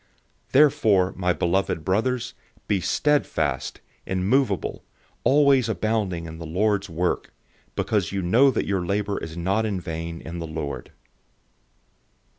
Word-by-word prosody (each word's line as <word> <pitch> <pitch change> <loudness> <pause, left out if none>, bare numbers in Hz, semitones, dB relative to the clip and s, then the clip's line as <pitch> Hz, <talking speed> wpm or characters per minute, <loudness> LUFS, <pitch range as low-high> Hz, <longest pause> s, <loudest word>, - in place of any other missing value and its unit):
015:058 - - -36
Therefore, 130 -10 +4
my 90 -1 +1
beloved 85 -2 0
brothers, 120 +6 0 0.3
be 100 -3 +1
steadfast, 80 - 0 0.3
immovable, 100 +3 0 0.4
always 140 -4 +4
abounding 105 -6 -1
in 80 0 -8
the 85 - -6
Lord's 100 +3 0
work, 85 +2 -1 0.4
because 105 -5 0
you 95 -1 -2
know 120 +11 +5
that 130 - 0
your 95 -3 0
labor 100 +2 -1
is 80 +1 -7
not 95 +6 +1
in 105 -4 -1
vain 85 0 -5
in 85 +1 -7
the 85 - -4
Lord. 75 -5 -5
95 Hz, 130 wpm, -24 LUFS, 85-110 Hz, 0.4 s, know